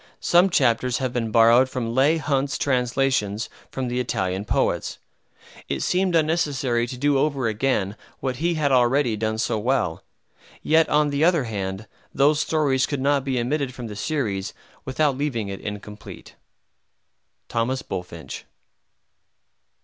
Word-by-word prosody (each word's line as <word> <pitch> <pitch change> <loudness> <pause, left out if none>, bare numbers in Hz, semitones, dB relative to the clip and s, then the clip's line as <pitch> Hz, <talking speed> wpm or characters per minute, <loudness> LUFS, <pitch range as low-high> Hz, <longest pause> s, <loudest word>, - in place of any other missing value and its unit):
Some 175 +3 +4
chapters 125 -5 +2
have 130 -2 -2
been 115 -2 -1
borrowed 115 +3 +5
from 115 -3 -3
Leigh 140 +6 +3
Hunt's 140 -2 -1
Translations 125 -5 0 0.2
from 130 -1 -3
the 125 +1 -2
Italian 95 -5 -2
Poets. - - 0 0.7
It - - -2
seemed 185 -1 +1
unnecessary 145 -7 +1
to 125 - -7
do 140 +1 +2
over 140 -4 0
again 105 -3 0 0.2
what 130 -2 -3
he 170 +2 0
had 150 -3 +1
already 125 -1 +3
done 110 +1 -2
so 110 0 0
well; 115 -8 0 0.6
yet, 160 +1 +3
on 150 0 +2
the 140 +2 0
other 170 -4 +4
hand, 100 -2 -4 0.3
those 145 +2 +4
stories 145 -4 +1
could 145 - -3
not 140 0 +2
be 130 -2 -1
omitted 130 +1 -1
from 125 - -7
the 105 -2 -7
series 105 -8 -2 0.3
without 140 +1 +1
leaving 120 -8 -2
it 95 - -6
incomplete. 105 0 -8 1.2
THOMAS 125 +3 -1
BULFINCH. 85 -6 -7
130 Hz, 140 wpm, -23 LUFS, 115-145 Hz, 1.2 s, borrowed